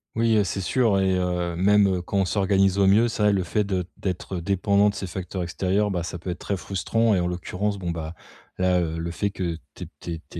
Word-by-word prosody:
Oui, 115 0 +3
heu, 105 - +4
c'est 95 0 -3
sûr 110 0 +2
et 95 -1 +2
heu, 90 -1 -1
même, 100 +3 +4
heu, 95 -2 0
quand 100 - -2
on 95 - +2
s'organise 95 0 +2
au 100 - +4
mieux, 105 +5 +5
c'est 115 -2 -2
vrai, 105 -1 +4
le 95 - +1
fait 100 +4 0
de 95 -2 -1
d'être 95 0 -4
dépendant 100 +3 +2
de - - -16
ces 95 - -5
facteurs 90 +1 -5
extérieurs, 95 +4 0
bah 90 -4 -2
ça 90 +1 -6
peut 90 - -7
être 90 - -3
très 100 - -3
frustrant. 105 +4 0
Et - - +2
en 90 - 0
l'occurrence, 90 +3 -2
bon 90 -2 -4
bah, 80 -1 -4 0.5
là, 90 -1 +3
heu, 80 -1 -2
le 85 +1 -3
fait 100 +4 -2
que 85 -4 -3 0.2
tu - - -8
aies - - -11
tu 85 - -6
aies 80 - -7
tu - - -7
95 Hz, 260 wpm, -24 LUFS, 90-100 Hz, 0.5 s, mieux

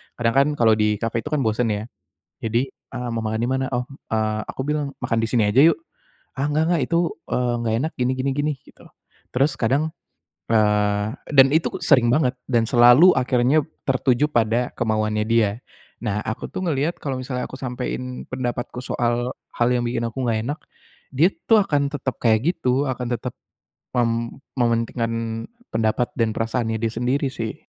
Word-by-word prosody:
Kadang 115 -1 0
kan 140 +1 +5
kalau 110 -2 +5
di 105 0 +2
cafe 115 0 -1
itu 150 - -6
kan 145 - +2
bosen 115 +2 +1
ya. 105 +1 -2 0.6
Jadi 115 +4 +1
eee, 125 -1 -7
"Mau 115 -1 -2
makan 110 +1 -2
di 120 - 0
mana?" 130 0 0
Oh, 125 - 0 0.3
eee 110 -1 0
aku - - -5
bilang, 150 -1 0 0.2
"Makan 115 -1 0
di - - +1
sini 115 -4 +3
aja 120 +6 +3
yuk!" 165 - +5 0.5
"Ah 140 +1 -1
enggak 150 +2 +1
enggak, 165 -5 +2
itu 170 - +2 0.3
eee, 125 -1 0
enggak 115 -1 -1
enak, 155 +4 -1
gini 125 +1 +2
gini 135 +1 0
gini." 150 +1 0
Gitu. - - -19 0.5
Terus 140 +4 +3
kadang, 140 +7 +1 0.6
eee, 105 -1 +2 0.2
dan 135 -2 +7
itu 160 - +2
sering 125 -5 +4
banget 130 -2 +2
dan 115 -3 +1
selalu 125 +9 +7
akhirnya 130 +3 +2 0.2
tertuju 130 +1 +2
pada 120 -2 +1
kemauannya 110 -1 0
dia. 115 -3 +3 0.5
Nah 105 -2 -1
aku 110 +3 -4
tuh - - -4
ngelihat 150 +2 -1
kalau 135 -3 -3
misalnya 130 0 -4
aku - - -9
sampein 125 0 -5
pendapatku 125 -1 -4
soal 120 +1 -1 0.2
hal 120 - +2
yang 120 -1 +1
bikin 120 -1 -2
aku 115 +2 -4
enggak 110 -1 +1
enak, 145 +6 -3 0.6
dia 170 +8 +4 0.2
tuh 220 -3 +6
akan 145 -5 +1
tetap 135 -3 -3
kayak 110 -2 +3
gitu, 135 -3 0
akan 125 -1 -4
tetap 120 +1 -6 0.6
mem 120 -2 +2 0.5
mementingkan 115 0 0 0.6
pendapat 115 +2 +1
dan 115 -1 +2
perasaannya 115 0 -1
dia 115 - +1
sendiri 125 +5 0
sih. 115 -3 -6
125 Hz, 175 wpm, -22 LUFS, 115-135 Hz, 0.6 s, dan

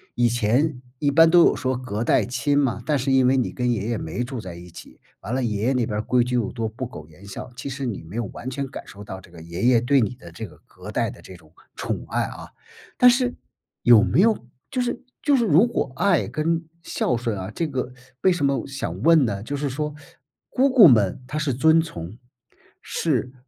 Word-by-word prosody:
以 120 -1 +3
前， 125 +5 +1 0.2
一 145 -1 +1
般 165 +3 +6
都 175 +1 +6
有 - - +5
说 130 -1 -1
隔 120 -4 -4
代 - - +3
亲 130 +4 0
嘛， 130 -5 +1
但 150 -2 +1
是 135 +1 -1
因 130 -1 +4
为 130 - +4
你 130 - 0
跟 125 -1 -1
爷 110 -2 -1
爷 115 - -1
没 100 +10 -4
住 125 0 -5
在 90 -5 -8
一 85 +1 -11
起， - - -14 0.2
完 115 +6 -4
了 130 - 0
爷 105 -3 -2
爷 130 +4 +2
那 125 -3 +1
边 105 -2 -3
儿 - - 0
规 125 +2 +2
矩 125 +1 -2
又 115 -4 0
多、 115 -2 -2
不 120 +4 -6
苟 75 -11 -10
言 90 +6 -16
笑， 100 - -8
其 - - -6
实 135 0 -4
你 105 -8 -4
没 85 +6 -11
有 120 - -1
完 125 +6 -7
全 140 +1 -3
感 - - -9
受 100 - -11
到 95 -2 -8
这 95 - -17
个 85 -2 -12
爷 85 +4 -6
爷 120 -2 +5
对 135 +3 +3
你 120 +2 0
的 85 -9 -13
这 105 +6 -7
个 - - -17
隔 - - -12
代 - - 0
的 - - -14
这 95 - -12
种， 80 -3 -19 0.2
宠 - - -4
爱 - - -1
啊。 - - -7 0.5
但 250 - +7
是 245 0 0 0.5
有 120 -3 +7
没 175 - +3
有 215 - +2 0.2
就 255 - -1
是 245 0 -3 0.2
就 290 -2 +3
是 240 - +2
如 180 +5 +5
果 220 - -2
“爱” 190 -2 +3
跟 165 +2 0 0.2
“孝 125 - -1
顺” 115 -3 -2
啊， 95 0 -6
这 165 - -2
个 130 -3 -3 0.3
为 190 - +4
什 175 -5 0
么 140 -1 0
想 135 0 -5
问 165 -4 +6
呢？ 100 -3 -3
就 145 +5 -4
是 145 +1 -2
说， 150 +3 -3 0.6
姑 265 +2 +2
姑 230 -9 +9
们 110 -3 +3
她 145 +3 -4
是 150 -3 0
遵 160 +6 +4
从， 100 - -8 0.6
是， 130 -6 -1
125 Hz, 260 characters per minute, -23 LUFS, 110-150 Hz, 0.6 s, 姑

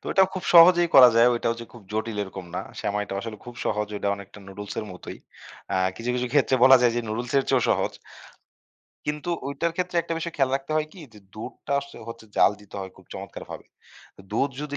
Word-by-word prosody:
তো - - -30
এটাও 190 -1 +5
খুব 185 - -5
সহজেই 175 0 +8
করা 130 -2 +10
যায়, 115 +1 +7
ওইটাও 115 -1 0
যে 115 - -7
খুব 120 -3 -13
জটিল 110 0 -2
এরকম 95 -1 -8
না। - - -1 0.2
সেমাইটা 105 0 -2
আসলে 110 0 -6
খুব 120 - -9
সহজ, 105 -1 -1
ঐটা 100 - -2
অনেকটা 100 +1 -12
নুডলস 100 +1 -8
এর 110 - -3
মতোই। 90 - -9 0.5
অ্যা - - +1 0.2
কিছু, 115 +4 -3
কিছু 125 0 -1
ক্ষেত্রে 140 -2 +3
বলা 130 0 +9
যায় 120 -1 +4
যে - - +1
নুডুলসের 120 +5 0
চেয়েও 130 -3 +3
সহজ। - - +1 1.1
কিন্তু 150 +3 -3 0.2
ওইটার 140 +4 -1
ক্ষেত্রে 180 -1 -2
একটা 165 0 -3
বিষয় 170 +1 -4
খেয়াল 135 -2 +2
রাখতে 140 +2 -7
হয় 155 0 +1
কি? 190 - -13
যে 105 - -14 0.2
দুধটা 110 +5 -7
আস 140 - -3 0.2
হচ্ছে 115 -1 -9
জ্বাল - - +5
দিতে 105 - -17
হয় 95 0 -6
খুব - - -18
চমৎকারভাবে। - - -8 0.7
দুধ 135 +6 +1
যদি 145 -1 -4
120 Hz, 205 wpm, -25 LUFS, 105-150 Hz, 1.1 s, করা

